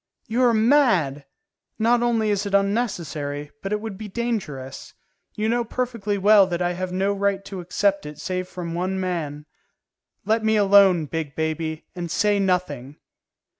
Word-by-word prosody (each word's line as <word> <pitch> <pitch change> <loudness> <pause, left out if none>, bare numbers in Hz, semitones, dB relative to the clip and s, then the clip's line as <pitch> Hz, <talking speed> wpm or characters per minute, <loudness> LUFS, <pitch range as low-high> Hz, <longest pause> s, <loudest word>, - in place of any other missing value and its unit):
"You 235 +3 0
are 240 - +5
mad; 215 - +3 0.5
not 235 +2 +3
only 225 -3 +1
is 205 0 -1
it 200 - 0
unnecessary, 170 - -1
but 195 - -5
it 210 - 0
would 215 -3 -7
be 215 - -6
dangerous. 190 - -4 0.4
You 215 +1 -1
know 240 +1 +1
perfectly 230 -4 -2
well 200 0 +6
that 175 -2 -2
I 175 0 0
have 185 +1 -4
no 195 +2 0
right 200 0 -1
to 195 -2 -7
accept 195 0 0
it 150 -1 -9
save 185 +4 -3
from 175 -2 -6
one 185 +2 -2
man. 160 -6 -3 0.8
Let 220 +2 +1
me 220 0 +3
alone, 195 -5 +5
big 150 -2 -4
baby, 160 0 -3
and 175 -1 -4
say 205 +4 +2
nothing." 160 -8 -1
195 Hz, 165 wpm, -23 LUFS, 165-215 Hz, 0.8 s, well